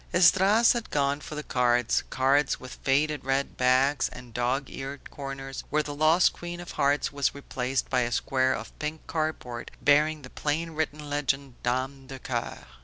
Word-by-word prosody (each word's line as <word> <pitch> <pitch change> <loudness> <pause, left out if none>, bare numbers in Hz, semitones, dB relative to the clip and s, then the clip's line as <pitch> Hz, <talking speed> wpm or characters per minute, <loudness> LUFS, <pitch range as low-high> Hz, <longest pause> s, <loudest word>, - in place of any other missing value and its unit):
Esdras 190 +6 +6
had 235 -2 -4
gone 140 0 0
for 150 - -7
the 150 - -4
cards; 120 -3 +2
cards 135 +2 +2
with 130 - -10
faded 145 +1 +1
red 135 +1 -1
backs 130 +3 +3
and 125 -2 -12
dog 125 +4 0
eared 135 +1 -7
corners, 135 -1 -6
where 150 +1 +1
the 145 - -5
lost 155 +4 +4
queen 175 0 -7
of 175 - -8
hearts 140 0 +1
was 140 -1 0
replaced 135 -2 -2
by 130 -1 +1
a 120 0 -1
square 130 0 +1
of 110 0 -8
pink 155 +1 -4
cardboard 155 -7 -3
bearing 150 +1 +3
the 130 - -9
plainly 160 +3 -2
written 150 -1 -3
legend 140 -3 -2
dame 130 +2 -2
de 135 0 -7
coeur. 120 -2 -4
140 Hz, 175 wpm, -27 LUFS, 130-150 Hz, -, Esdras